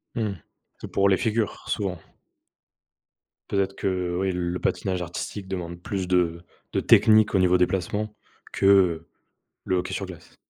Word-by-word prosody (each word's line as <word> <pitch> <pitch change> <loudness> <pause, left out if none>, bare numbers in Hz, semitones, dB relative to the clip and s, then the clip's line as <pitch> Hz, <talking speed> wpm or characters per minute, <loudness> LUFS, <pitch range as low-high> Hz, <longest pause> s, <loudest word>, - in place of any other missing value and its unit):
Mmh, 110 -3 -1 0.5
c'est - - -8
pour 100 0 +3
les 95 - +4
figures, 110 -1 -1
souvent. 95 -4 -2 1.5
Peut-être 100 -1 0
que, 90 -2 -1
oui, 95 -1 +1
le 90 0 -2
patinage 95 -2 -1
artistique 95 +3 -5
demande 85 -2 -5
plus 95 -3 -3
de 90 -2 +1 0.3
de - - +2
technique 110 -1 +5
au 95 - +4
niveau 90 0 +4
des 90 - +4
placements 105 +3 -2 0.4
que, - - -1
heu, 95 -5 +4 0.6
le 95 - +1
hockey 90 - -3
sur - - -3
glace. - - -12
95 Hz, 155 wpm, -25 LUFS, 90-100 Hz, 1.5 s, technique